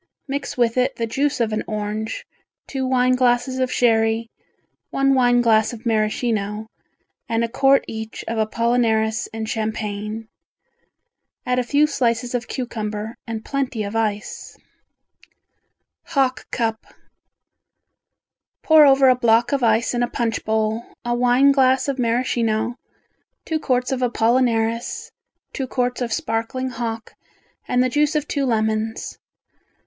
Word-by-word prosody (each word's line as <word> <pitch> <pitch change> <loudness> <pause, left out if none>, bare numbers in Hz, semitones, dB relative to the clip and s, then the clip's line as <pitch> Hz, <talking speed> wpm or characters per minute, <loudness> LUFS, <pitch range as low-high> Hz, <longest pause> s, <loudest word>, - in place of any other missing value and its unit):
Mix 275 -1 -4
with 235 0 +1
it 255 0 +1
the 230 - -2
juice 275 +5 -1
of 225 -2 0
an 215 - -1
orange, 215 +1 -4 0.4
two 265 -1 -3
wine 255 0 +3
glasses 250 +1 +1
of 255 -1 0
sherry, 225 -1 +2 0.6
one 275 0 +2
wine 245 -2 +4
glass 220 -1 +3
of 230 0 -10
Maraschino, 215 -1 0 0.6
and 230 0 +1
a - - +1
quart 270 +3 +3
each 220 0 -6
of 230 0 -2
apollinaris 220 0 +1
and 220 0 -5
champagne. 215 -1 -3 1.2
Add 250 0 +1
a - - +1
few 285 +4 +3
slices 245 -4 0
of 245 0 -2
cucumber 215 -3 -4
and 225 -1 -5
plenty 265 -5 -2
of 200 +2 -5
ice. 210 -2 -3 1.5
Hock 275 -6 0
Cup 225 -2 -2 1.8
Pour 315 -2 +7
over 270 0 +5
a 255 - +7
block 235 0 +3
of 280 -1 +1
ice 230 0 +2
in 240 - 0
a 240 - 0
punch 230 -2 -2
bowl, 220 +1 0 0.2
a 240 - 0
wine 250 +3 +4
glass 265 -1 +3
of 275 -1 -2
Maraschino, 230 -1 0 0.7
two 320 -1 -1
quarts 250 -3 0
of 260 -1 -1
apollinaris, 230 -1 0 0.4
two 265 - -3
quarts 250 0 -1
of 240 -2 -2
sparkling 230 +4 -2
hock 230 -1 -5 0.5
and 250 0 +2
the - - +2
juice 295 +4 +1
of 300 0 0
two 280 -2 -1
lemons. 220 -1 -1
235 Hz, 135 wpm, -21 LUFS, 220-255 Hz, 1.8 s, Pour